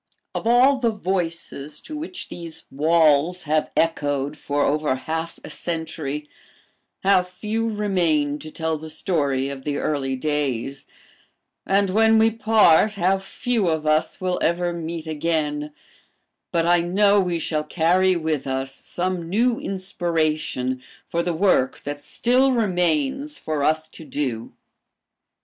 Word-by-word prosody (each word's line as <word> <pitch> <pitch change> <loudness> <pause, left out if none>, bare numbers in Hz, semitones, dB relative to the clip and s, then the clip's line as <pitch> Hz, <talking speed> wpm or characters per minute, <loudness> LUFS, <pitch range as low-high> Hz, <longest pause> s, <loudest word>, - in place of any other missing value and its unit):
"Of - - -3
all 255 +3 +5
the 235 -2 +2
voices 170 -7 -2
to 310 - -8
which 335 +5 -6
these 165 -1 -6
walls 160 +3 +3
have 155 0 0
echoed 145 -3 0
for 145 -1 -1
over 150 -2 +1
half 160 +5 -4
a - - -8
century, 155 -3 -3 0.8
how 195 -1 +5
few 215 +5 -3
remain 170 -9 +1
to 155 - -8
tell 160 0 -2
the 160 +1 -8
story 145 -5 0
of 135 -1 -7
the 145 -1 -2
early 135 -3 -1
days, 140 -2 -2 0.8
and 195 0 +2
when 220 +2 +5
we 225 +1 +5
part, 215 -3 +4
how 195 -1 +1
few 215 +2 -1
of 160 -2 0
us 155 +1 +1
will 185 -1 -1
ever 175 +1 +1
meet 165 -1 -5
again; 150 -1 -1 0.8
but 165 -1 +1
I 175 0 +4
know 200 +4 +3
we 180 -3 0
shall 155 -2 -1
carry 180 +4 +2
with 155 -5 -2
us 135 0 -2
some 175 +2 -3
new 235 +5 +2
inspiration 160 -9 -1 0.3
for 170 - -1
the 170 -1 -1
work 165 -7 +2
that 145 0 -6
still 255 - +2
remains 180 - 0
for 155 -2 -2
us 155 +1 +2
to - - -11
do. 130 -7 -3
165 Hz, 140 wpm, -23 LUFS, 150-190 Hz, 0.8 s, all